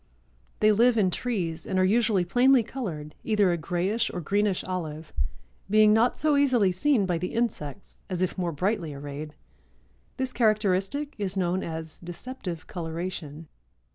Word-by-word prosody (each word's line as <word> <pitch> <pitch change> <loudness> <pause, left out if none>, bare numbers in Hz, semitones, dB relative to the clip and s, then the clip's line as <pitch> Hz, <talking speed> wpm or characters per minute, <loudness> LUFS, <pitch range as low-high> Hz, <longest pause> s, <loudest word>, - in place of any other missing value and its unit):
They 215 0 +6
live 230 +3 +4
in 190 -4 +3
trees 175 -9 -2
and 190 - -1
are 185 - +4
usually 215 -2 +3
plainly 245 +6 +4
colored, 175 - -5
either 210 -4 +3
a - - +2
grayish 185 +8 0
or 180 - -4
greenish 200 +3 0
olive, 160 -4 -5 0.6
being 215 0 +6
not 230 +3 +3
so 305 -1 +2
easily 255 -9 +4
seen 230 +3 +2
by 175 -3 0
the 180 +5 -4
insects 200 -7 -3
as 185 -1 -1
if 185 - -1
more 175 -2 -1
brightly 170 -1 -1
arrayed. 145 +2 -7 0.8
This 260 -1 -2
characteristic 215 +5 +1
is 195 -1 -2
known 185 0 +1
as 160 -1 -6
deceptive 175 0 -6
coloration. 165 -2 -5
190 Hz, 150 wpm, -27 LUFS, 170-225 Hz, 0.8 s, They